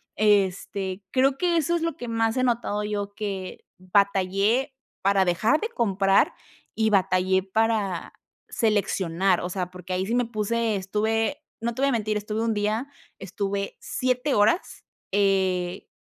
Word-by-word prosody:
Este, 195 -1 +1
creo 270 +1 +3
que 345 0 +1
eso 330 +2 +1
es 330 - -1
lo 330 -3 -1
que 245 - -6
más 225 0 0
he 255 - +1
notado 230 -4 0
yo, 205 -1 -3
que 195 -3 -5
batallé 200 +6 +1 0.3
para 195 0 +4
dejar 205 - +2
de 445 - -2
comprar 195 - +2 0.4
y 220 -1 +1
batallé 190 -1 +2
para 205 -2 0 0.4
seleccionar. 195 -4 +1
O 180 - -3
sea, 180 -1 -3
porque 180 0 -7
ahí 185 +1 0
sí 230 - 0
me 245 0 +2
puse, 230 0 -1
estuve. 220 +8 -1 0.2
No 235 0 -1
te 260 - -5
voy 275 0 +3
mentir. 215 -3 0
Estuve 210 +1 -3
un 230 -1 +1
día, 215 +5 -1 0.3
estuve 200 +1 -4
7, 255 +2 -1
horas, 210 - +1 0.3
eh, 190 -2 +1
205 Hz, 150 wpm, -25 LUFS, 190-230 Hz, 0.4 s, para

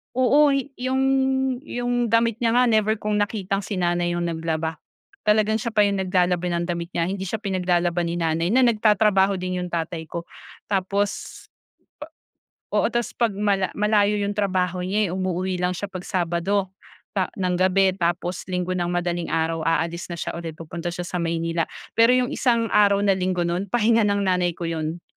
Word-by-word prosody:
Oo 280 +3 +4 0.2
'yong 260 +1 0 0.6
'yong 245 0 -1
damit 230 0 +2
niya 230 -2 +1
nga 245 -1 +4
never 215 0 +3
kung 210 0 0
nakitang 200 -2 -1
si 210 - -4
nanay 175 -1 0
yung 175 - -1
naglaba, 160 -1 -3 0.5
talagang 215 +1 +3
siya 230 0 -4
pa 210 - +5
yung 200 -1 +1
naglalaba 180 -1 +1
ng 175 -1 -1
damit 170 0 -3
niya, 170 - +1
hindi 195 -1 -4
siya 220 +3 -4
pinaglalaba 180 -3 0
ni 170 - -2
nanay 165 -1 0
na 260 - +5
nagtatrabaho 210 -4 +3
din 185 0 -3
'yong 180 - -3
tatay 165 -1 -3
ko. 170 +2 -5 0.5
Tapos 200 +1 -1 1.3
oo, - - +2
tapos 240 -3 0
'pag 230 -4 0
mala 200 -2 0
malayo 210 0 +2
'yong 205 +1 -3
trabaho 185 -2 0
niya 200 -1 0
umuuwi 185 0 -2
lang 180 0 0
siya 205 +2 -5
pag 185 -2 -7
Sabado, 185 +2 0 0.4
pa 190 -3 0
ng 185 -2 -1
gabi 190 +1 +4
tapos 175 +1 -2
Linggo 180 0 -2
ng 180 -1 -1
madaling 175 -1 -1
araw 165 -1 -1
aalis 165 +1 0
na - - -3
siya - - -3
ulit 165 -2 -6
pupunta 170 +2 -6
siya 175 - -4
sa 175 0 -4
Maynila. 165 0 -1 0.3
Pero 230 +2 +6
'yong 250 -1 +1
isang 235 -3 +1
araw 200 -1 +4
na 195 -2 +2
Linggo 185 -1 0
no'n, 175 +3 -1
pahinga 225 +1 +3
ng 200 0 +1
nanay 180 -3 +1
ko 175 - -10
'yon. 165 0 -3
185 Hz, 175 wpm, -23 LUFS, 175-210 Hz, 1.3 s, Pero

